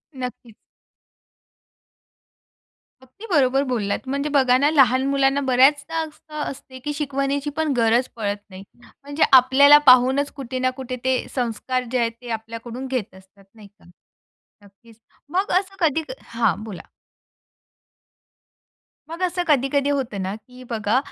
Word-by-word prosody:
नक्कीच. 250 -3 -7 2.5
अगदी 260 - -14
बरोबर 270 -3 +3
बोललात. 230 -7 -2
म्हणजे 280 +2 -2
बघा 255 -2 +4
ना, 285 +3 +3
लहान 260 -3 +4
मुलांना 275 0 +2
बऱ्याचदा 280 +5 +3
असं 305 0 -10
असते, 260 -2 -7
की 295 +3 -4
शिकवण्याची 280 0 -2
पण 315 -3 0
गरज 235 +2 +2
पडत 205 -3 -2
नाही. 190 0 -11 0.4
म्हणजे 285 +2 -1
आपल्याला 265 +3 +7
पाहूनच 260 +3 +4
कुठे 260 -2 -5
ना 255 0 +1
कुठे 255 -1 -5
ते 260 0 +2 0.2
संस्कार 250 +1 -2
जे 255 - 0
आहेत 230 -1 0
ते 245 - -10
आपल्याकडून 230 +3 -8
घेत 250 -7 -4
असतात, 190 +1 -19
नाही 215 -2 -14
का. 200 -2 -26 0.8
नक्कीच, 220 +3 -20 0.3
मग 375 +5 -1
असं 390 0 -10
कधी 320 -2 +1 0.2
हां, 230 -2 -1
बोला. 205 -5 -9 2.2
मग 335 +2 -8
असं 355 0 -1
कधी-कधी 280 -1 +1
होतं 260 -8 -2
ना, 190 +2 -3
की 250 +4 -15
बघा 220 0 0
260 Hz, 135 wpm, -22 LUFS, 230-285 Hz, 2.5 s, आपल्याला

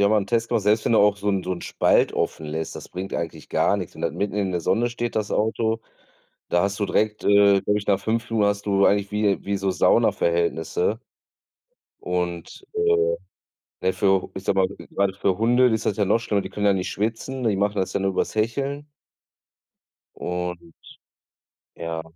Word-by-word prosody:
habe 100 - +5
mal - - +5
'nen 100 - -5
Test 115 +1 0
gemacht, 115 -4 0
selbst 105 +2 +2
wenn - - +2
du 115 - +5
auch 100 0 +4
so 105 +1 -2
'n 95 -2 +1
so 95 - -2
'n 90 - -5
Spalt - - +2
offen 80 - -2
lässt, 80 +1 -4
das - - -9
bringt 95 +2 -6
eigentlich 85 -2 -5
gar 100 - +2
nix. 90 -4 -6
Und - - -11
dann, - - -2
mitten 100 -1 -2
in 100 -2 0
der 90 -1 -1
Sonne 115 +8 +1
steht, 120 0 -4
das 105 -1 -1
Auto. 110 +1 0 0.7
Da 85 - +2
hast 100 +1 -2
du - - +2
direkt, 105 +1 0
äh, 100 -1 +5
glaube 105 0 +1
ich, 100 - -10
nach 100 - +4
5 115 +3 -2
Minuten 105 -3 +2
hast 100 0 -3
du 100 -1 +3
eigentlich 100 0 +2
wie, 105 -1 +1
wie 100 0 0
so 95 0 0
Saunaverhältnisse 85 +3 +1 1.0
und, 90 - -4
äh, 435 +2 +2 0.7
naja 95 - +1
für 95 0 +2
h - - -9
ich 95 - -7
sage 95 - +1
mal, 95 - +3 0.2
gerade 100 -1 0
für 95 -1 0
Hunde 120 +3 +4
ist 110 -2 -1
das 100 - 0
ja 105 - +2
noch 105 +4 +3
schlimmer, 105 -3 0
die - - -6
können 105 0 -1
ja 100 - +5
nicht 95 -1 -2
schwitzen, 115 +5 -3
die 105 -4 +2
machen 100 +1 0
das 95 - -1
ja - - -1
nur 95 0 +1
übers - - -1
Hecheln 135 +7 -1 1.3
und 90 - -5 1.0
ja. 85 -1 -4
100 Hz, 210 wpm, -23 LUFS, 95-110 Hz, 1.3 s, habe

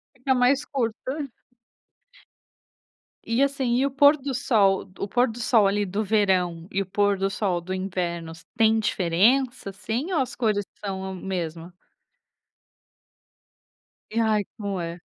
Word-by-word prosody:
Fica 255 +1 0
mais 255 +3 +3
curto. 270 +3 -3 2.0
E 230 +3 0
assim, 275 -3 +1
e 270 - +2
o 280 - -1
pôr 285 +2 +6
do 275 0 -4
sol 200 -6 +2
o - - -2
pôr 245 +4 +2
do 235 - -10
sol 225 -3 +4
ali 205 +1 +1
do 200 +4 -2
verão 185 -5 +1
e 195 - -1
o - - -3
pôr 200 +1 +1
do 195 +1 0
sol 190 -3 -1
do 185 +2 -5
invernos, 170 -4 -4
têm 225 0 +4
diferença 220 +6 +1
assim 220 - -4
ou 340 - +1
as 255 -1 -2
cores 210 -4 0 0.2
são 190 -1 -4
mesma? 175 -2 -5 2.4
E 225 - -2
ai, 215 -2 +2
como 200 -3 -3
é? 170 0 -5
205 Hz, 145 wpm, -25 LUFS, 190-250 Hz, 2.4 s, pôr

